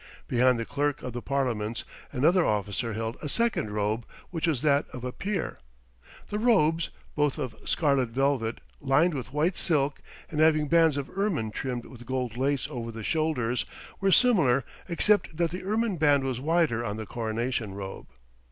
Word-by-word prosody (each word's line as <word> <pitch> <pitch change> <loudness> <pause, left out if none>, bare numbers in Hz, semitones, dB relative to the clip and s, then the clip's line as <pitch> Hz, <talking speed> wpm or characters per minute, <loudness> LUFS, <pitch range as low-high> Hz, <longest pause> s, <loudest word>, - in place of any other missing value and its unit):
Behind 125 0 +3
the 115 - -2
Clerk 145 +2 -1
of 125 -2 -5
the 120 - -4
Parliaments 120 -5 -1 0.3
another 165 +7 +3
officer 105 +1 -1
held 115 +2 -3
a 150 - -4
second 230 - +1
robe, 105 +2 -1 0.3
which 170 -1 -1
was 150 -5 0
that 145 -1 +3
of 125 - -8
a 125 - -3
peer. 195 +5 -3 0.7
The 210 - -1
robes, 170 -8 +3 0.3
both 150 -1 +1
of 130 -6 -4
scarlet 140 -6 +2
velvet, 130 -2 0 0.2
lined 145 +6 +3
with 130 -2 -5
white 155 +6 +1
silk, 145 -4 +1 0.3
and 155 - -2
having 155 -1 +4
bands 165 -2 +4
of 140 +3 -5
ermine 190 - 0
trimmed 125 +1 -4
with 120 -2 -12
gold 125 -3 -2
lace 135 +2 0
over 115 -1 -5
the 115 -1 -7
shoulders, 125 -6 0 0.3
were 195 -1 +2
similar, 160 - +4 0.2
except 180 -1 +2
that 170 -1 +1
the 180 +1 -5
ermine 215 0 0
band 145 -3 +4
was 130 -2 -2
wider 150 -5 +1
on 105 -2 -3
the 110 - -5
coronation 115 -1 -2
robe. 95 -1 -7
140 Hz, 170 wpm, -28 LUFS, 120-160 Hz, 0.7 s, having